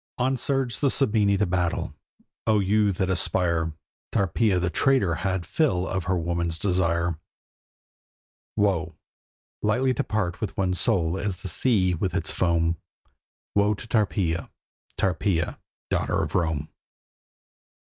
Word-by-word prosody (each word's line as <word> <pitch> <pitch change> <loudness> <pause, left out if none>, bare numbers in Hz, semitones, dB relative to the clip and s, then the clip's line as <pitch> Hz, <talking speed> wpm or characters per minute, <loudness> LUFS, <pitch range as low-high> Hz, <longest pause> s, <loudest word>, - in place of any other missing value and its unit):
On 130 +2 +1
surged 130 -1 -1
the 140 - +4
Sabini 105 -7 +2
to 105 - +2
battle. 90 -2 -1 0.5
O 110 -1 +4
you 100 +1 +3
that 95 0 -1
aspire! 85 -3 +1 0.4
Tarpeia 100 +1 +2
the 90 0 0
traitor 130 -10 +3
had 95 -2 -1
fill 95 - +1
of 95 -2 -2
her 95 -1 +1
woman's 85 -1 -1
desire. 85 -2 0 1.4
Woe: 95 -7 +1 0.7
lightly 125 +5 +2
to - - -1
part 100 -2 -2
with 110 - -4
one's 90 -2 0
soul 85 0 +1
as 100 -2 -3
the - - -2
sea 95 -1 +3
with 90 +1 -2
its - - 0
foam! 85 -1 +1 0.8
Woe 105 +1 +3
to 105 - -10
Tarpeia, 100 -6 0 0.5
Tarpeia, 90 -2 0 0.3
daughter - - +1
of - - -4
Rome! 80 -4 0
95 Hz, 130 wpm, -25 LUFS, 85-105 Hz, 1.4 s, the